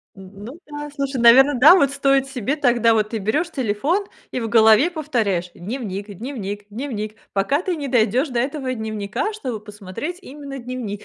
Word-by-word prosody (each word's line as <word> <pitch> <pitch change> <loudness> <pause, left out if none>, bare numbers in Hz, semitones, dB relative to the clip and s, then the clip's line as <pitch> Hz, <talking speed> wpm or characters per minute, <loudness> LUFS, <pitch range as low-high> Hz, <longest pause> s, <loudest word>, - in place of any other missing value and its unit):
Ну 200 - -11
да, 295 0 -7
слушай, 275 -2 -3
наверно, 265 +5 +7
да, 290 +9 +8
вот 280 -7 +3
стоит 275 -1 +2
себе 270 0 -2
тогда, 240 -5 +3
вот 215 -1 +1
ты 225 - -2
берёшь 295 - -1
телефон 275 - -1 0.3
и - - -2
в 225 - -3
голове 220 +6 +5
повторяешь: 225 - -1
"Дневник 200 0 -5
дневник 205 -3 -6
дневник", 215 -2 -5 0.2
пока 265 - +1
ты 370 -2 -2
не 290 -3 -5
дойдёшь 245 +3 +2
до 245 -2 -1
этого 265 0 -2
дневника, 220 - -3
чтобы 255 - -5
посмотреть 210 - -7
именно 280 -4 -9
дневник. 235 -5 -6
245 Hz, 170 wpm, -21 LUFS, 210-280 Hz, 0.3 s, да